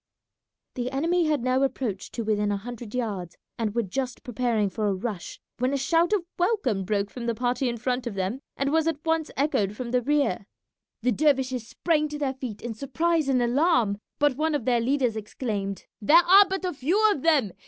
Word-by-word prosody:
The 245 0 -3
enemy 330 +6 +1
had 300 -5 0
now 255 +1 +2
approached 245 -8 -2
to 235 - -3
within 210 -1 0
a 200 - 0
hundred 240 +1 -8
yards, 200 -8 -3 0.2
and 215 -2 -1
were 235 - +2
just 250 +5 -4
preparing 240 -4 0
for 210 +2 -2
a 200 - +1
rush 195 -2 -5 0.2
when 255 +3 +1
a - - +1
shout 335 +5 +2
of 405 -5 +1
welcome 300 - +1
broke 200 0 -1
from 240 -2 -6
the 235 - 0
party 245 +2 0
in 235 - -3
front 250 +1 -2
of 220 - -4
them 195 +6 -2 0.2
and 275 +1 0
was 320 +1 +2
at 315 -2 -2
once 325 -1 +1
echoed 215 -8 +1
from 240 +1 -5
the 250 0 +2
rear. 275 -8 0 0.6
The 250 - +3
dervishes 260 -3 +1
sprang 305 +1 0
to 300 - -5
their 280 -3 -1
feet 250 -6 -7
in 240 -1 -3
surprise 305 +6 0
and 255 -2 +3
alarm, 240 - +2 0.2
but 290 -3 +2
one 315 0 +1
of 265 -6 -2
their 240 -2 +2
leaders 250 -2 +1
exclaimed, 205 -2 -4 0.2
"There 295 +11 +6
are 390 +3 +8
but 380 0 -2
a 360 - -1
few 345 +11 +2
of 295 - -2
them! 285 - +3
255 Hz, 205 wpm, -26 LUFS, 220-295 Hz, 0.6 s, are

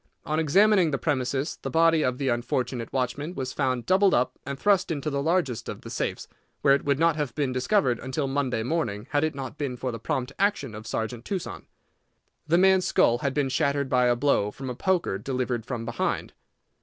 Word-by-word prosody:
On 155 +2 0
examining 185 +3 +4
the 140 - -1
premises 135 0 -1
the - - -4
body 165 -1 +4
of 125 0 0
the 135 -1 -1
unfortunate 120 0 -2
watchman 140 +6 -2
was 130 -1 -4
found 130 -3 -1
doubled 190 +1 +4
up 125 +1 0
and 140 0 -4
thrust 195 +1 +2
into 150 -2 -2
the 140 0 -1
largest 160 -6 0
of - - -6
the - - -9
safes, - - -3 0.4
where 140 - +6
it 140 - +1
would 140 -1 +1
not 165 0 +3
have 145 -6 -3
been 140 -4 -1
discovered 130 - +1
until 130 +2 -2
Monday 135 -4 -1
morning 120 -7 -2
had 145 0 +2
it 155 -2 -1
not 135 0 -7
been 135 -4 -3
for 130 +1 -3
the 115 - -6
prompt 125 +3 -2
action 195 - 0
of 110 +1 -9
Sergeant 110 +1 -3
Tuson. 190 +2 -5 0.8
The 170 - +4
man's 190 0 +4
skull 120 +1 +3
had 140 -1 -2
been 145 -2 +1
shattered 140 +1 0
by 125 -1 +3
a 120 - +3
blow 120 -5 +2
from 130 +4 -6
a - - -6
poker 175 - 0
delivered 125 -1 -2
from 120 -3 -4
behind. 115 0 -2
135 Hz, 205 wpm, -26 LUFS, 125-155 Hz, 0.8 s, where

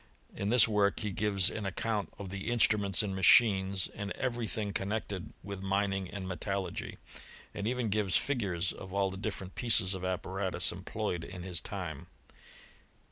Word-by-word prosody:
In 100 - -2
this 120 -1 +7
work 105 -2 +2
he 105 -2 -2
gives 100 -1 +2
an 110 - -4
account 105 +2 -2
pff 100 - -6
the 95 +4 -4
instruments 105 -5 +3
and 100 -2 -3
machines, 95 -1 +5
and 100 -1 -5
every 120 -1 -2
thing 105 -2 -2
coi|jMi 100 0 -2
nected 95 -4 -6 0.2
with 100 0 -6
mining 95 -1 0
and 100 -2 -6
metallurgy; 95 +2 -3 0.6
and 100 +1 -3
even 120 -3 -1
ghfii 100 -4 +3
figures 95 -10 0
of 95 - -10
all 100 -1 +2
the - - -6
different 95 -2 -5
pieces 100 -6 +3
of 95 -1 -5
apparatus 95 +1 0
eoil^ - - -9
ployed 85 -2 -2
in 90 0 -8
his 90 -4 -1
time. - - -6
100 Hz, 170 wpm, -31 LUFS, 95-105 Hz, 0.6 s, this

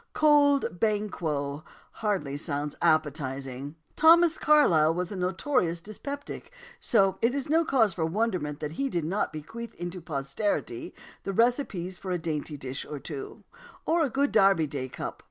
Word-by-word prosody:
"Cold 285 - +4
Banquo" 160 -9 -1 0.3
hardly 190 -10 -2
sounds 145 0 -2
appetising. 140 -3 -1 0.2
Thomas 330 +1 +6
Carlyle 165 - +4
was 180 +1 -2
a - - -4
notorious 180 - 0
dyspeptic, 280 - -7 0.3
so 195 -4 +2
it 240 +3 +2
is 280 0 -3
no 325 +1 +4
cause 225 - +3
for 165 - -2
wonderment 165 -5 -1
that 150 -1 -3
he 275 +10 -1
did 170 -9 -1
not 190 +6 -1
bequeath 225 +10 -8
to 175 +1 -5
posterity 140 - -3 0.3
the 195 - -4
recipes 200 -6 0
for 190 - -7
a 180 - 0
dainty 155 -2 -4
dish 135 0 -5
or 150 - -7
two, 410 - -8 0.4
or 335 +1 +2
a 295 - +2
good 280 +3 +1
Derby 195 -6 +4
Day 140 -3 -5
"Cup." - - -6
180 Hz, 155 wpm, -28 LUFS, 150-235 Hz, 0.4 s, Thomas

